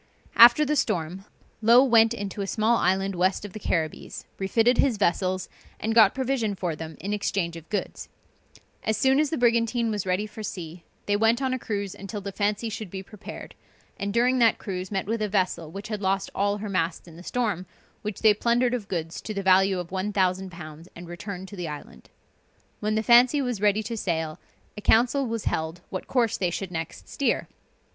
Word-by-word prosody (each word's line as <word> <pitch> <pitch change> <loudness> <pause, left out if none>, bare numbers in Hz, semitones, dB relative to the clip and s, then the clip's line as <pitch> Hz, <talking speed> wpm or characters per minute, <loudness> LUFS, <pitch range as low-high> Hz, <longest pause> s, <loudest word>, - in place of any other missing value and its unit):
After 240 +6 +8
the 300 +2 0
storm, 185 - -1 0.4
Low 235 +4 +7
went 230 -3 +5
into 205 -3 -4
a 195 - -3
small 225 +3 +2
island 195 0 +1
west 185 +3 +1
of 200 - -9
the 215 - -7
Carribbees, 160 -5 -3
refitted 225 +5 +2
his 260 -6 +3
vessels, 185 -1 0 0.3
and 225 +1 -1
got 220 -3 +6
provision 260 -5 -1
for 175 -4 -2
them 160 0 -8
in 200 +4 -3
exchange 195 -4 -1
of 165 -1 -11
goods. 210 - -4 0.7
As 220 -1 0
soon 265 +4 +3
as 305 -1 +2
the 320 - -2
brigantine 235 -1 +2
was 205 -3 -3
ready 185 +3 0
for 215 +1 -9
sea, 175 -4 -7 0.2
they 205 - +1
went 225 +3 +3
on 265 -1 0
a 255 - -2
cruise 200 -4 -3
until 200 +2 -7
the 200 0 -6
Fancy 210 +3 -1
should 215 -2 -5
be 190 +1 -6
prepared, 210 +1 -10 0.4
and 200 0 -3
during 250 +3 +2
that 230 -2 +4
cruise, 185 -2 -5
met 195 -2 -1
with 225 +2 -2
a 210 - 0
vessel 185 -5 0
which 200 +6 -8
had 210 -2 -3
lost 195 0 0
all 200 +1 0
her 210 +1 -5
masts 175 -3 -2
in 165 - -13
the 170 - -11
storm, 205 -3 -2 0.3
which 210 -2 -5
they 215 -1 +7
plundered 235 +3 +1
of 230 -5 -3
goods 165 -2 -4
to 215 - -6
the 200 - -2
value 190 0 +4
of 175 -1 -5
1000_l_. 185 -4 -2
and 175 0 -9
returned 185 +2 -7
to 205 - -10
the 175 -3 -4
island. 145 - -9 0.7
When 215 +1 -1
the 220 - 0
Fancy 245 +5 +6
was 250 -7 -2
ready 210 +1 +3
to 230 +2 -4
sail, 160 -6 -2 0.4
a 210 - -7
council 245 +5 +3
was 230 -1 -3
held 160 +2 -2
what 185 - -5
course 240 -4 +1
they 180 - 0
should 180 +2 -4
next 165 -1 -6
steer. 280 - -1
205 Hz, 200 wpm, -26 LUFS, 185-230 Hz, 0.7 s, After